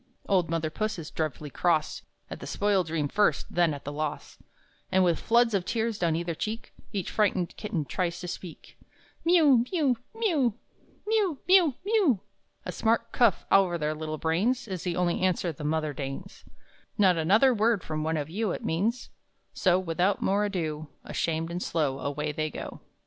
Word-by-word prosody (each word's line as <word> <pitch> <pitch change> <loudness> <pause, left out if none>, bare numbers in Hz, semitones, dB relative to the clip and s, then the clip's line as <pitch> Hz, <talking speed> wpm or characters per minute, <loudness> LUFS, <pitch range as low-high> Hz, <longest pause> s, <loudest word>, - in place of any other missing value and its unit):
Old 180 -4 +2
mother 165 -1 -1
Puss 215 +4 -2
is 160 -3 -7
dreadfully 155 -2 -3
cross, 165 -4 +1 0.3
At - - -8
the - - -8
spoiled 200 -4 +1
dream 155 -2 -1
first, 205 +8 +2
then 175 -2 +3
at 140 -1 -6
the 145 - -4
loss; 150 0 -4 0.5
And 190 0 +4
with 175 -2 +2
floods 235 0 +3
of 195 -3 +1
tears 225 +2 -1
down 165 -2 +1
either 170 +1 -2
cheek 215 +8 -5 0.2
Each 195 -4 -3
frightened 190 -5 +1
kitten 205 -8 -3
tries 175 +2 -2
to 180 - -5
speak: 175 -1 -9 0.4
"Miew, 320 -7 +5
miew, 290 -9 +2 0.2
miew! 315 - +1 0.5
Miew, 415 -8 +1
miew, 360 -7 +5
miew!" 400 - +3 0.5
A - - -3
smart 230 +1 0
cuff 235 -7 +3
over 185 -3 +4
their 155 -1 -1
little 155 0 -4
brains 195 +12 0
Is 185 -4 -4
the 175 -2 -1
only 180 -1 0
answer 185 -2 +1
the 150 - -9
mother 155 0 -1
deigns 135 -1 -7 0.5
"Not 190 -3 +5
another 215 +11 +4
word 220 -3 +2
from 155 -1 -3
one 160 +1 0
of 145 -2 -2
you!" 205 +6 -2
It - - -6
means, 220 +9 -1 0.4
so 180 -2 +3
without 185 +2 0
more 200 +2 +1
ado, 155 -6 -3 0.2
Ashamed 165 0 -2
and 175 +1 -3
slow 145 -7 -1
Away 150 +2 -2
they 155 +1 -2
go. - - -8
180 Hz, 175 wpm, -28 LUFS, 160-220 Hz, 0.5 s, Miew